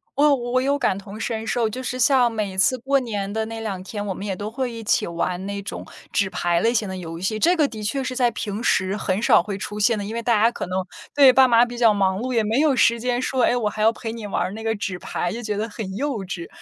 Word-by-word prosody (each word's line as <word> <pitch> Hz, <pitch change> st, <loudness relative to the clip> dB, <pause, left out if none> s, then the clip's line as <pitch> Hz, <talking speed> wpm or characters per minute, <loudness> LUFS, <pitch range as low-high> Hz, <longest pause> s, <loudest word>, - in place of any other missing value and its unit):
我 290 Hz, 0 st, +5 dB
我 250 Hz, 0 st, 0 dB
有 280 Hz, +2 st, +1 dB
感 195 Hz, -6 st, +1 dB
同 200 Hz, +2 st, -9 dB
身 225 Hz, -1 st, -3 dB
受， 230 Hz, -1 st, 0 dB
就 255 Hz, +4 st, -6 dB
是 255 Hz, 0 st, -3 dB
像 250 Hz, -2 st, +4 dB
每 205 Hz, -4 st, -3 dB
次 255 Hz, +6 st, +3 dB
过 270 Hz, +3 st, +1 dB
年 205 Hz, -4 st, -3 dB
的 220 Hz, +1 st, -1 dB
那 225 Hz, 0 st, -6 dB
2 195 Hz, -4 st, -4 dB
天， 205 Hz, +1 st, -5 dB
我 195 Hz, -, -2 dB
们 195 Hz, -, -7 dB
也 195 Hz, -, -2 dB
都 205 Hz, +3 st, -5 dB
会 255 Hz, 0 st, -3 dB
一 230 Hz, -1 st, -7 dB
起 -, -, +2 dB
玩 180 Hz, +2 st, -2 dB
那 200 Hz, 0 st, -4 dB
种 200 Hz, -, -7 dB, 0.3 s
纸 195 Hz, -2 st, +1 dB
牌 175 Hz, -2 st, 0 dB
类 230 Hz, +1 st, +2 dB
型 215 Hz, -3 st, 0 dB
的 190 Hz, -, -5 dB
游 165 Hz, -2 st, -7 dB
戏， 215 Hz, +4 st, -1 dB
这 345 Hz, +10 st, +3 dB
个 300 Hz, -3 st, +3 dB
的 215 Hz, -4 st, -8 dB
确 270 Hz, +6 st, -1 dB
是 255 Hz, 0 st, -4 dB
在 245 Hz, -2 st, +3 dB
平 210 Hz, +1 st, -4 dB
时 190 Hz, +2 st, +1 dB
很 190 Hz, +1 st, -1 dB
少 205 Hz, -, +5 dB
会 200 Hz, -1 st, -4 dB
出 210 Hz, +1 st, -6 dB
现 215 Hz, +2 st, +3 dB
的。 -, -, -3 dB
因 220 Hz, -, -5 dB
为 235 Hz, -, -2 dB
大 230 Hz, -3 st, +2 dB
家 230 Hz, -, +5 dB
可 -, -, -5 dB
能 185 Hz, 0 st, -2 dB, 0.3 s
对， 275 Hz, -3 st, +8 dB
爸 265 Hz, 0 st, +6 dB
妈 235 Hz, +1 st, +6 dB
比 240 Hz, 0 st, -8 dB
较 230 Hz, -3 st, +5 dB
忙 190 Hz, -1 st, +1 dB
碌， 255 Hz, +2 st, -3 dB
也 225 Hz, -2 st, +2 dB
没 225 Hz, +5 st, +1 dB
有 300 Hz, -3 st, +3 dB
时 235 Hz, 0 st, +4 dB
间 245 Hz, +1 st, -1 dB
说， 255 Hz, -2 st, 0 dB
诶， -, -, +4 dB
我 215 Hz, -3 st, 0 dB
还 215 Hz, -, -5 dB
要 220 Hz, +1 st, +5 dB
陪 225 Hz, -1 st, -6 dB
你 225 Hz, -3 st, -7 dB
玩 -, -, -1 dB
儿 185 Hz, -, -3 dB
那 220 Hz, +2 st, -7 dB
个 225 Hz, 0 st, 0 dB
纸 190 Hz, -2 st, -4 dB
牌， 175 Hz, -, -3 dB
就 235 Hz, -, -5 dB
觉 210 Hz, -2 st, -3 dB
得 220 Hz, +2 st, -2 dB
很 200 Hz, -3 st, -6 dB
幼 285 Hz, +5 st, -1 dB
稚。 175 Hz, -2 st, -6 dB
220 Hz, 305 characters per minute, -22 LUFS, 200-245 Hz, 0.3 s, 对